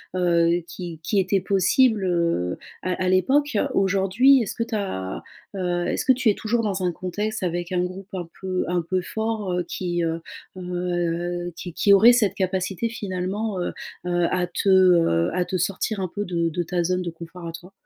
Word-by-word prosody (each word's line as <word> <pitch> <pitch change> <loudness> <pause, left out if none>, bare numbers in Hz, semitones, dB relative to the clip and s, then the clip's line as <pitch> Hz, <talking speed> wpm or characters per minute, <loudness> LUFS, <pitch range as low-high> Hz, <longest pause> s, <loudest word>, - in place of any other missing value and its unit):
heu, 170 -1 +3
qui 165 -2 -7
qui 200 +5 +1
était 195 +1 +1
possible, 200 +3 +3
heu, 170 - 0 0.3
à 185 - 0
à 180 - +1
l'époque. 265 +8 +2 0.2
Aujourd'hui, 195 +7 +4
est-ce - - -4
que - - -5
tu 230 - -4
as, 95 - -3 0.3
heu, 175 -2 -1
est-ce - - -1
que 260 - +6
tu 255 -3 +2
es 205 - +3
toujours 230 +1 0
dans 195 -4 -2
un 180 - +1
contexte 205 +5 -3
avec 175 0 -2
un 180 -1 +1
groupe 185 +1 -6
un 175 -3 -5
peu 185 -1 -2
un 175 -1 +1
peu 185 +2 -1
fort, 220 -1 -3
heu, 180 - 0
qui, 175 -2 -2
heu, 165 0 -1 0.4
heu, 175 -1 -2
qui 175 -1 -7
qui 200 +2 +4
aurait 220 +5 +8
cette 210 -5 +2
capacité, 190 +3 -1
finalement, 200 0 -3
heu, - - -2 0.3
heu, 175 -1 +1
à 180 -1 0
te, 175 +3 -1
heu, 175 - +5
à 180 -1 0
te 185 - -4
sortir 195 +3 -1
un 185 - -1
peu 205 0 -2
de 170 -2 0
de 175 +2 -2
ta 175 +1 -1
zone 180 +1 0
de 175 - -3
confort, 170 +1 -9
à 165 - -4
toi? 180 +3 -10
185 Hz, 200 wpm, -24 LUFS, 175-200 Hz, 0.4 s, aurait